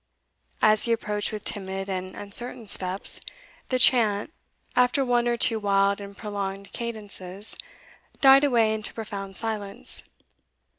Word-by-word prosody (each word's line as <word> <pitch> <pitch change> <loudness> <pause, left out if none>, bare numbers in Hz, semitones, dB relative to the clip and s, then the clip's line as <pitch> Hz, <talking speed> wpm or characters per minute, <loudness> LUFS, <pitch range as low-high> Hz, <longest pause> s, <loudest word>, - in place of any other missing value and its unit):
As 215 0 +5
he 235 - 0
approached 210 -2 -2
with 215 -1 -6
timid 195 -1 -3
and 185 -1 -4
uncertain 230 +3 -4
steps, 190 -1 0 0.5
the 255 - +2
chant, 230 0 +4 0.4
after 250 +2 +3
one 240 -1 +2
or 240 0 +1
two 225 -1 +4
wild 200 0 +2
and 200 0 -10
prolonged 200 -2 -5
cadences, 205 -4 -4 0.6
died 270 0 +7
away 230 -6 +3
into 215 -1 -4
profound 200 -3 -6
silence. 210 -3 -3
210 Hz, 130 wpm, -26 LUFS, 200-235 Hz, 0.6 s, died